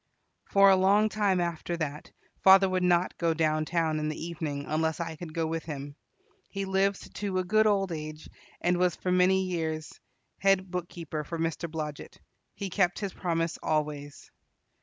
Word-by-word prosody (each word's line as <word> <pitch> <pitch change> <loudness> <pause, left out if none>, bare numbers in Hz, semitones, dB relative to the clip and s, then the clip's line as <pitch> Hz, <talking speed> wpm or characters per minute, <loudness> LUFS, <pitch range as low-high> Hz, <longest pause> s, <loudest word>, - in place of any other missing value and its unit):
For 195 0 +6
a - - +6
long 200 +3 +4
time 205 -4 +1
after 170 0 -2
that 150 -2 -4 0.3
father 190 0 +8
would 185 0 0
not 180 0 +2
go 165 -1 +1
downtown 155 0 +1
in 155 0 -1
the 155 - -5
evening 155 -4 -4
unless 160 +1 -1
I 165 -1 -4
could 160 0 -8
go 165 +1 -1
with 165 0 -3
him. 145 -2 -6 0.5
He 195 0 -3
lived 195 +1 0
to 195 -2 -2
a 185 - +1
good 215 +4 +3
old 195 -3 +1
age, 155 -1 -6 0.3
and 175 0 +2
was 180 -1 +2
for 180 - -2
many 185 +1 +4
years 160 -3 -3 0.5
head 195 -2 +2
bookkeeper 170 -3 -4
for 165 +3 -5
Mr. 165 +1 -2
Blodget. 155 -2 -6 0.4
He 195 -2 -5
kept 180 -2 +2
his 200 -3 -4
promise 165 -1 -2
always. 150 -2 -3
170 Hz, 170 wpm, -28 LUFS, 155-190 Hz, 0.5 s, father